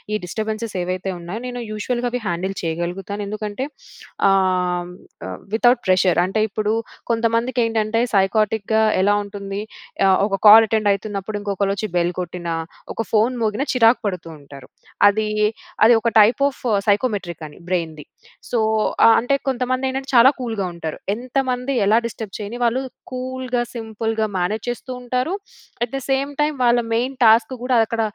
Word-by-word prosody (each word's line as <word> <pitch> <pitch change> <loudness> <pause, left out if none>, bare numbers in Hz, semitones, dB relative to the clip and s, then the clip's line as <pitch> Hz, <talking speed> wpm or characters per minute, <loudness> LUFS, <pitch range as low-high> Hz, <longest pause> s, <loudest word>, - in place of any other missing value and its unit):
ఈ - - +2
డిస్టబెన్స్‌స్ 220 +3 -4
ఏవైతే 185 +1 -3
ఉన్నాయో, 175 +7 -6
నేను 245 -1 -5
యూషువల్‌గా 240 +3 -2
అవి 250 -1 -2
హ్యాండిల్ 185 +3 -2
చేయగలుగుతాను. 175 +5 -3
ఎందుకంటే 215 +5 -4 0.6
ఆహ్, 180 -2 +1 0.6
విత్‌అవుట్ 240 +2 +3
ప్రెషర్ 185 -1 +3
అంటే 195 +4 -1
ఇప్పుడు 215 +2 -1 0.4
కొంతమందికి 230 +2 0
ఏంటంటే 225 0 0
సైక్ఆర్టిక్‌గా 215 +2 +2 0.2
ఎలా 205 +1 +3
ఉంటుంది. 200 0 -6 0.5
ఆహ్, 190 - +5
ఒక 195 -2 -3
కాల్ 225 +1 +9
అటెండ్ 215 -2 +2
అవుతున్నప్పుడు 205 +1 -4
ఇంకొకళ్ళు 200 -1 -1
వచ్చి 215 0 -3
బెల్ 175 +1 +1
కొట్టినా, 175 -1 -4 0.4
ఒక - - -3
ఫోన్ 225 +3 +2
మోగిన 220 +3 0
చిరాకు 235 -1 +4
పడుతూ 180 -4 -3
ఉంటారు. 140 -2 -13 0.4
అది 215 +1 +2 0.6
అది 235 +2 +7
ఒక 235 - +1
టైప్ 215 +5 +5
ఆఫ్ 280 - -6 0.2
సైకోమెట్రిక్ 200 - 0
అని 150 - -15
బ్రెయిన్‌ది. 165 -4 -2 0.5
సో, 235 - 0 0.5
ఆహ్, 230 - +8
అంటే 245 +4 +1
కొంతమంది 255 0 0
ఏంటంటే 265 +1 -4
చాలా 235 +2 +8
కూల్‌గా 225 -6 -2
ఉంటారు. 160 -2 -5 0.2
ఎంతమంది 255 +1 -2
ఎలా 215 +3 +4
డిస్టర్బ్ 220 -3 -6
చేయని 215 +3 -6
వాళ్ళు 240 +3 +1 0.3
కూల్‌గా, 255 -1 -3
సింపుల్‌గా 225 -1 -2
మేనేజ్ 205 +5 -1
చేస్తూ 245 +2 -5
ఉంటారు. 250 +7 -1 0.5
ఏట్ 240 - -23
ద - - -2
సేమ్ 275 +1 0
టైమ్ 295 0 +1
వాళ్ళ 240 0 +4
మెయిన్ 255 +4 0
టాస్క్ 225 +3 +5
కూడా 250 0 +1
అక్కడ 230 +1 -2
220 Hz, 150 wpm, -21 LUFS, 195-245 Hz, 0.6 s, కాల్